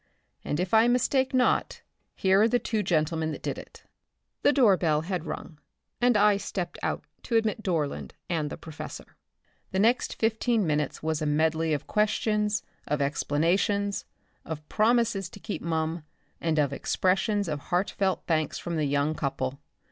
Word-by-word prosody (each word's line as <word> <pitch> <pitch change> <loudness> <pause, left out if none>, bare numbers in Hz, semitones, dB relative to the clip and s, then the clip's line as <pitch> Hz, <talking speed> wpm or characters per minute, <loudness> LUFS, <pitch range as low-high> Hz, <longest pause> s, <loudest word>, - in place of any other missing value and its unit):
"And 145 - -2
if 180 +2 -2
I 220 +1 +6
mistake 255 +2 +2
not 255 -1 +1 0.3
here 190 +1 +4
are 220 - +6
the 245 - +3
two 220 -3 -1
gentlemen 160 -3 0
that - - -8
did - - -3
it." - - -13 0.6
The - - +5
doorbell 185 - +4
had 175 -1 -3
rung 155 0 -7 0.4
and 245 -2 +4
I 210 -1 +5
stepped 180 -3 -4
out - - -2 0.2
to 235 - -3
admit 225 0 +1
Dorland 150 - -2
and 155 -3 -1
the - - -6
professor. 160 -2 -9 0.5
The 190 - -3
next 230 +5 +2
15 225 -1 +1
minutes 150 -2 -1
was 160 -1 -1
a 155 - 0
medley 160 +2 +1
of 145 -2 -1
questions, 210 0 +1 0.2
of 150 - 0
explanations, 175 +8 +1 0.4
of 155 -1 -7
promises 220 -4 +2
to 200 - -12
keep 200 -4 -5
mum 160 0 -1 0.4
and 160 -2 0
of 140 -2 +2
expressions 195 +5 +1
of 150 -2 -2
heartfelt 190 +4 0
thanks 155 -3 0
from 170 -1 -4
the 155 - +1
young 145 +2 +1
couple. 135 -2 -3
175 Hz, 160 wpm, -27 LUFS, 155-210 Hz, 0.6 s, I